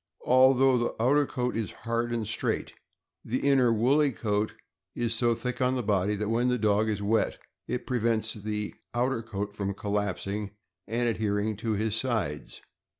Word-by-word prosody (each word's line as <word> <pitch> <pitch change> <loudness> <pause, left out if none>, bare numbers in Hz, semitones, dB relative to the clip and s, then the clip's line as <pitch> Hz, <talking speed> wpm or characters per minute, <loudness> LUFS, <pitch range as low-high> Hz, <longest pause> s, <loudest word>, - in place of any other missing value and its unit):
Although 130 0 +5
the 120 - -1
outer 140 +5 +3
coat 125 0 -2
is 110 -4 -2
hard 115 0 0
and 115 -2 -1
straight, 110 - -2 0.5
the 130 +4 -1
inner 130 -4 +4
woolly 135 +6 +3
coat 105 -2 -1 0.4
is 120 -1 0
so 115 0 +2
thick 125 +2 -4
on 130 0 +2
the 125 - -1
body 100 -1 +1
that 105 +1 -2
when 120 +2 +2
the 125 0 +2
dog 110 0 +2
is 100 -1 -2
wet 110 +2 +1 0.3
it 125 - -3
prevents 115 -3 0
the 105 0 -4 0.2
outer 125 0 +1
coat 105 -2 -5
from 100 -1 -3
collapsing 100 0 -2 0.3
and 120 +3 0
adhering 105 -1 0
to 110 +1 -1
his 105 +1 0
sides. 110 - -2
115 Hz, 165 wpm, -28 LUFS, 105-125 Hz, 0.5 s, Although